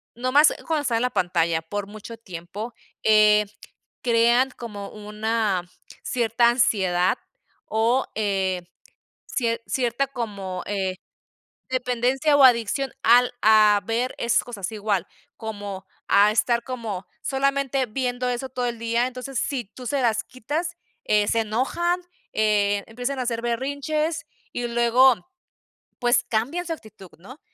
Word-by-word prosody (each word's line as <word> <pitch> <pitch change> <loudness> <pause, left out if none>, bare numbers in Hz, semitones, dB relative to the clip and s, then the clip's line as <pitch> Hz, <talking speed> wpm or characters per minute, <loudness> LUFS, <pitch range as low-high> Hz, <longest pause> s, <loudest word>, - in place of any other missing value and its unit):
nomás 255 +5 +4
cuando 310 -3 0
está 235 -4 0
en 225 - +1
la 250 - +1
pantalla 170 -4 +1
por 205 +5 -4
mucho 215 +2 -9
tiempo, 205 +3 -7 0.3
eh, 210 -1 +5 0.6
crean 240 +2 +3
como 210 -5 -8
una 210 -2 -1 0.4
cierta 235 0 +2
ansiedad, 190 -7 +2 0.5
o, 230 +4 +1
eh, 195 -4 0 0.7
cier 230 -2 -1
cierta 255 +1 0
como, 200 -8 -5
eh, 190 -2 -2 0.7
dependencia, 255 +3 +1
o 275 - +6
adicción 250 +2 +3
al 245 +2 +5
a 215 -1 +6
ver 235 +3 -1
esas 235 -1 +2
cosas 210 -5 -5
igual, 205 -4 -1 0.3
como 205 -4 -6 0.2
a 205 +1 +6
estar 235 +1 +2
como, 225 -7 -5 0.2
solamente 275 -1 0
viendo 250 +1 -2
eso 250 +2 -2
todo 250 -1 -2
el 235 -1 -3
día. 235 +2 +1
Entonces, 255 0 -5
si 260 -1 -1
tú 245 +5 -12
se 280 +3 0
las 225 -2 +2
quitas, 300 +8 -4 0.3
eh, 210 -1 +3
se 230 - +2
enojan, 270 +11 0 0.3
eh, 205 -2 +2
empiezan 245 +4 -4
a - - 0
hacer 235 -1 -2
berrinches, 285 +7 -1 0.3
y 245 0 -2
luego, 240 +2 +5 0.9
pues 245 0 +3
cambian 270 +11 -1
su 330 - -1
actitud, 215 - -12
¿no? 255 - -13
235 Hz, 135 wpm, -24 LUFS, 210-255 Hz, 0.9 s, o